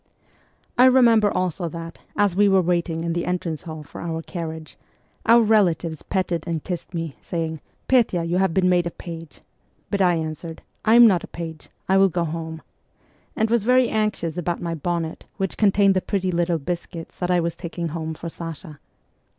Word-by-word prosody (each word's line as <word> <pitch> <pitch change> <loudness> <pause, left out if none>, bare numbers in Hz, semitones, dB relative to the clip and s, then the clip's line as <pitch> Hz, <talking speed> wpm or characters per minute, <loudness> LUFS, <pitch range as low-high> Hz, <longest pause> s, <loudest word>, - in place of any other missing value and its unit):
I 250 - +9
remember 235 -5 +6
also 180 -2 -1
that, 165 +1 -8 0.2
as 205 -4 +2
we 205 +1 +5
were 190 -1 +4
waiting 170 -1 0
in 170 0 -1
the 170 0 -2
entrance 175 -3 -2
hall 155 -2 -8
for - - -10
our 165 -1 -3
carriage, 160 -3 -6 0.5
our 230 +1 +7
relatives 175 -7 +2
petted 180 -4 -1
and 165 -3 -2
kissed 180 0 -5
me, 165 -4 -4
saying, 160 -3 -3
' - - -42
Petya, 230 -9 +3
you 170 +2 0
have 190 -2 +2
been 185 +2 +2
made 175 -1 +3
a - - -1
page; 165 -2 -9 0.2
' - - -41
but 200 -1 +1
I 180 -2 +4
answered, 160 0 -5
' - - -25
I 220 +1 +5
am 240 0 +9
not 190 -6 +4
a - - -7
page; 165 -2 -8 0.2
I 190 - +4
will 195 0 +5
go 175 0 -1
home,' 160 0 -5 0.7
and 220 +1 +1
was 235 -3 +3
very 250 +1 +4
anxious 210 -7 -1
about 175 0 -2
my 170 -1 -3
bonnet 165 0 -3
which 195 -2 -2
contained 200 -1 +4
the 185 - +1
pretty 190 -2 -1
little 170 -1 +1
biscuits 165 +2 -6
that 180 - -1
I 180 -1 +3
was 170 -1 -1
taking 170 -1 -5
home 160 0 -4
for 170 - -7
Sasha. 165 -2 -8
175 Hz, 200 wpm, -23 LUFS, 165-195 Hz, 0.7 s, I